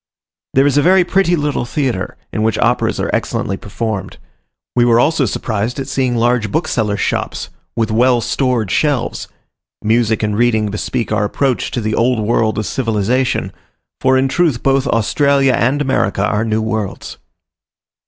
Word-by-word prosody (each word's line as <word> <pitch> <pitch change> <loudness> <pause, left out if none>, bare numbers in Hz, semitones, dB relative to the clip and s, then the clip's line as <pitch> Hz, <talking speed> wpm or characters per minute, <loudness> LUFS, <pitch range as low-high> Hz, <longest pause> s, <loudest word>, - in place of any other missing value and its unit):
There 135 +1 +5
is 145 0 +3
a - - +4
very 185 +3 +5
pretty 180 0 +2
little 150 -4 -1
theatre, 130 0 -2 0.2
in 110 - -1
which 110 -1 +1
operas - - +1
are - - -1
excellently 95 - -1
performed. 100 0 -5 0.6
We 120 - +4
were 120 -1 +4
also 145 +2 +2
surprised 110 +4 -2
at 135 - -4
seeing 130 -3 0
large 120 -2 +1
booksellers' 110 -11 -1
shops, - - -2 0.2
with 115 -1 0
well 120 +2 +3
stored 120 -4 -1
shelves; 145 -6 0 0.6
music 110 0 +1
and 105 -1 0
reading 110 -2 +1
bespeak 115 +3 -3
our 105 -1 +1
approach 130 +4 -1
to 120 - -3
the 110 0 -2
old 120 +1 +2
world 110 0 +1
of 110 - -1
civilization; 120 +1 0 0.5
for 130 0 +3
in 130 +1 +2
truth 150 -4 0
both 135 0 +2
Australia 135 +4 +2
and 135 +5 +1
America 100 -7 0
are 105 +2 0
new 110 0 0
worlds. 110 -3 -4
120 Hz, 160 wpm, -16 LUFS, 110-135 Hz, 0.6 s, There